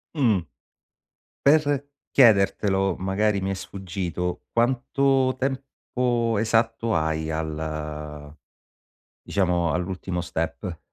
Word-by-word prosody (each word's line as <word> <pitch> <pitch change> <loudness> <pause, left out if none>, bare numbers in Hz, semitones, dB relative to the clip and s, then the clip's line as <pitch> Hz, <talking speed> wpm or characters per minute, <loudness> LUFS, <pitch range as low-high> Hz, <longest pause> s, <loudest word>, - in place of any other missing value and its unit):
Mh. 115 - +3 1.0
Per 145 -1 +3 0.2
chiedertelo 100 -5 +4
magari 100 +2 0
mi 95 - -1
è - - 0
sfuggito 90 -2 -4
quanto 130 +2 +2
tempo 125 -3 -1
esatto 115 +1 +1
hai 80 0 0
al 75 -1 -5 0.9
diciamo 90 -4 +1
all'ultimo 90 +1 -3
step? 85 +1 -4
95 Hz, 80 wpm, -25 LUFS, 85-120 Hz, 1.0 s, chiedertelo